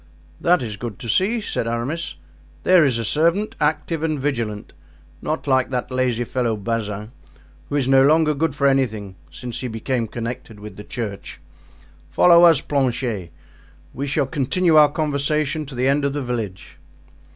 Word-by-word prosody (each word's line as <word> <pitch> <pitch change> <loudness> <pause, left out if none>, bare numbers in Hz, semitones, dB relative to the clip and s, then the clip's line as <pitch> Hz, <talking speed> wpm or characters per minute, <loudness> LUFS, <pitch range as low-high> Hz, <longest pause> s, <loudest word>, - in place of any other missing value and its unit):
"That 175 -5 +3
is 105 -3 -5
good 115 -5 -6
to - - -8
see," 210 - +1
said 115 - -3
Aramis. 120 +9 -3 0.5
"There 185 -2 +6
is 130 -5 +2
a 115 - -3
servant 170 - +1
active 155 +1 0
and 155 -2 -1
vigilant, 115 -7 -3 0.5
not 155 +1 -3
like 130 -2 +2
that 125 0 -3
lazy 125 -2 0
fellow 120 -2 -1
Bazin, 105 0 -3 0.6
who - - -3
is 135 -3 +1
no 135 0 +5
longer 155 +2 +4
good 150 0 -1
for 140 - 0
anything 110 -8 0
since 120 +9 -7
he 130 - -4
became 115 +1 -2
connected 115 -2 -6
with 105 -2 -10
the 105 - -9
church. 105 -4 -6 0.7
Follow 170 - +6
us, 165 -5 +5
Planchet; 120 - -1 0.6
we 140 +2 -4
shall 145 0 +1
continue 160 +5 +1
our 150 -1 +7
conversation 150 0 -1
to 135 - -9
the 125 +2 +1
end 140 +1 +2
of 140 0 0
the 145 -1 -3
village." 115 -7 -5
135 Hz, 165 wpm, -21 LUFS, 115-150 Hz, 0.7 s, our